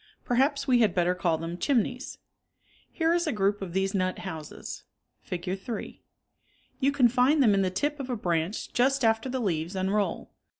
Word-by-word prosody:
Perhaps 275 +4 +1
we 250 -2 +4
had 215 -6 +3
better 180 0 +2
call 175 -3 0
them 165 +2 -5
chimneys. 255 -1 0 0.7
Here 325 0 +1
is 345 -1 +1
a - - +1
group 205 -1 0
of 190 -3 -5
these 190 +1 0
nut 185 -2 0
houses 160 -5 -7 0.4
(Fig. 180 +2 -4
3). 225 +3 -6 0.8
You 275 +1 +3
can 270 -3 +5
find 255 +5 +3
them 215 -5 +5
in 195 - +3
the 190 - +1
tip 290 +11 -2
of 265 -1 -5
a 250 - 0
branch 175 +1 -2
just 265 +1 +2
after 225 +3 +2
the 260 0 -2
leaves 175 -4 -2
unroll. 190 0 -1
210 Hz, 180 wpm, -27 LUFS, 185-260 Hz, 0.8 s, can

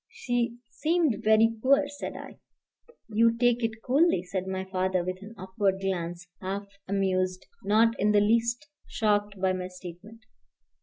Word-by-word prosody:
She 240 -1 -2
seemed 320 -6 +1
very 220 +1 +4
poor," 275 +3 +4
said 285 0 -7
I. - - -10 0.7
"You 230 +1 +3
take 245 0 +2
it 225 0 -3
coolly," 275 - +3
said 185 0 -4
my 190 0 -3
father, 185 -1 0
with 185 +1 -3
an 215 +3 -11
upward 190 +1 -1
glance, 175 -2 -3 0.2
half 195 +2 -3 0.2
amused, 185 -1 0 0.2
not 225 +2 +4
in 210 +2 +3
the 210 - +5
least 235 +6 +1 0.2
shocked 205 -2 0
by 190 0 +2
my 180 0 -3
statement. 185 +5 -11
205 Hz, 150 wpm, -27 LUFS, 185-230 Hz, 0.7 s, the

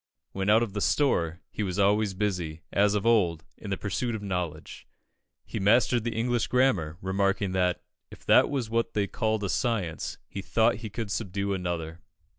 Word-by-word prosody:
When 95 +1 -2
out 110 +2 +5
of 105 -5 -4
the 105 - -3
"store," 90 - +1
he - - -4
was 95 -3 -2
always 100 0 +2
busy, 90 -6 -2
as 105 +1 +3
of 105 - -1
old, 90 -9 +2
in 105 - -7
the 95 - -1
pursuit 115 +4 -2
of 105 - -6
knowledge. 90 -5 -4 0.6
He - - -5
mastered 115 +3 +3
the 115 -1 -3
English 120 +1 0
grammar, 125 -12 +1
remarking 100 0 0
that, 90 -1 0 0.3
"if - - -14
that - - +5
was 135 -5 -2
what 115 +1 -1
they 105 -1 +2
called 110 +1 -1
a 100 - -1
science, 105 -11 -1
he 100 - -6
thought 115 +4 +2
he 110 0 -7
could 105 -1 -5
subdue 100 -1 -2
another." 85 -3 -3
100 Hz, 185 wpm, -27 LUFS, 90-110 Hz, 0.6 s, out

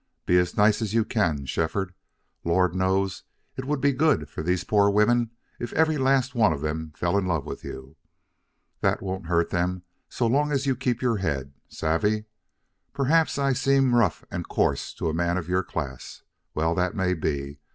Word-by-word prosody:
Be 90 0 +4
as 90 0 -1
nice 105 +1 +4
as 110 -1 -2
you 115 -2 +3
can, 80 -13 0
Shefford. 90 +6 -2 0.5
Lord 90 +1 +2
knows 95 0 0 0.3
it 130 - -5
would 145 +1 -1
be 140 +1 +3
good 140 - +2
for - - -5
these 90 +2 0
poor 100 -1 +3
women 115 +3 +3 0.3
if 120 - -4
every 155 -1 +2
last 130 -1 +2
one 110 -8 +4
of 70 -3 -3
them 80 +1 -3
fell 85 +3 +1
in 95 - -2
love 80 -6 -1
with - - -7
you. 70 +4 -9 0.8
That - - 0
won't 95 -3 -4
hurt 85 -1 +1
them 90 +1 -1 0.3
so 120 - -1
long 145 +6 +2
as 140 -1 0
you 135 -1 +2
keep 125 0 -1
your 120 -3 +2
head. 70 -7 -2 0.2
Savvy? 105 +7 0 0.7
Perhaps 145 +4 +2
I 140 -1 +2
seem 135 0 +3
rough 115 -8 +2
and - - -4
coarse - - 0
to - - -3
a 80 - 0
man 85 +2 0
of 85 -3 -4
your 90 +1 +1
class. 70 -8 -6 0.3
Well, 80 +2 +1
that 90 +1 0
may 95 -2 +1
be. 70 -3 -3
95 Hz, 190 wpm, -25 LUFS, 85-120 Hz, 0.8 s, Be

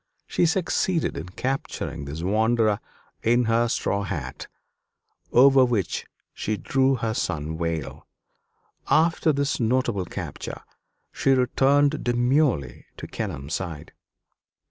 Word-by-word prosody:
She 175 - +1
succeeded 175 -1 0
in 85 - -6
capturing 90 - -4
this 75 +4 -6
wanderer 110 +2 +2 0.4
in 120 +2 +3
her 115 +1 +2
straw 100 -3 -1
hat, 75 -10 -5 0.8
over 135 +1 +7
which 115 -7 -1 0.3
she 110 0 -2
drew 135 +3 +2
her 115 -3 -2
sun 80 -5 -2
veil. 80 -5 -4 0.8
After 160 0 +3
this 140 0 -1
notable 120 -5 +1
capture - - -6 0.5
she 135 - +2
returned 140 +3 +2
demurely 120 - +1
to - - -7
Kenelm's 80 -9 -5
side. 80 -4 -5
115 Hz, 110 wpm, -25 LUFS, 85-135 Hz, 0.8 s, over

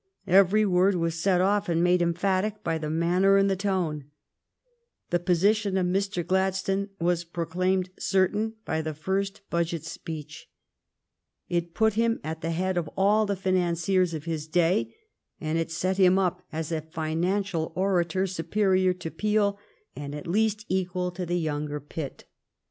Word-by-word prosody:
Every 195 +3 +5
word 190 0 +3
was 165 -1 -1
set 180 -1 +3
off 200 +1 +1
and 170 0 +2
made 180 0 +3
emphatic 190 +5 0
by 165 -3 -1
the 155 -1 -4
manner 180 +5 +3
and 195 0 +4
the - - +2
tone. 180 -7 -1 1.1
The 175 - +2
position 195 +3 +2
of 185 - +1
Mr. 190 -1 -1
Gladstone 190 +2 0
was 175 0 +1
proclaimed 180 +2 -1
certain 205 +3 +1
by 160 0 -1
the 155 -1 -4
first 195 +6 -2
budget 170 -2 -1
speech. 155 -3 -8 1.0
It 170 -1 -2
put 220 -1 +3
him 230 +1 +1
at 160 +2 -5
the 165 - -2
head 180 +2 -1
of 165 -3 -1
all 210 +2 +3
the 200 - 0
financiers 180 -1 +1
of 150 - -5
his 160 -2 -3
day, 175 +5 +2 0.5
and 160 0 -1
it 165 - -2
set 185 +3 -1
him 185 -1 +5
up 180 -2 0
as 160 0 -4
a 160 -1 -1
financial 165 +3 -2
orator 185 -1 +1
superior 185 +1 +1
to 170 -3 -7
Peel 205 +2 +1 0.4
and 145 0 -6
at 150 - -7
least 215 +3 0
equal 180 -1 -1
to 180 0 -5
the 175 +1 0
younger 150 -2 -2
Pitt. 145 -1 -7
180 Hz, 160 wpm, -27 LUFS, 165-195 Hz, 1.1 s, Every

